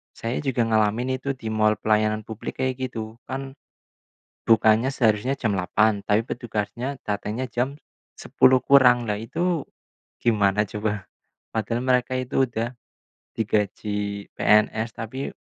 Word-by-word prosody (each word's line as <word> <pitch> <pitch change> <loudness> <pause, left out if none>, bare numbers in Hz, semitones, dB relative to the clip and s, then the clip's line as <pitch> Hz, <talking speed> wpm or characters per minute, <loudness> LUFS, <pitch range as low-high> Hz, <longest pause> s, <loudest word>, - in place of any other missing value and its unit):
Saya 115 +2 -3
juga 130 -4 0
ngalamin 115 +4 +1
itu 140 +1 -3
di 115 -4 -5
mal 110 0 +3
pelayanan 110 0 +1
publik 110 +3 -7
kayak 130 0 -1
gitu, 110 -1 -7
kan 135 0 -5 0.9
bukanya 115 +2 +4
seharusnya 125 +1 +1
jam 110 -6 0
8.00 100 +3 +1
tapi 105 +3 +1
petugasnya 120 +3 -4
datangnya 105 +4 -2
jam 125 +4 -2 0.4
10.00 130 0 +4
kurang. 125 -3 +5
Lah 105 - 0
itu 165 +7 -1 0.6
gimana 105 -3 +3
coba. 105 -2 -3 0.5
Padahal 115 +2 -1
mereka 130 0 +1
itu 130 +1 0
udah 120 0 -3 0.6
digaji 105 -1 -1
PNS 110 +2 +2
tapi 120 +5 -4
115 Hz, 125 wpm, -24 LUFS, 105-130 Hz, 0.9 s, kurang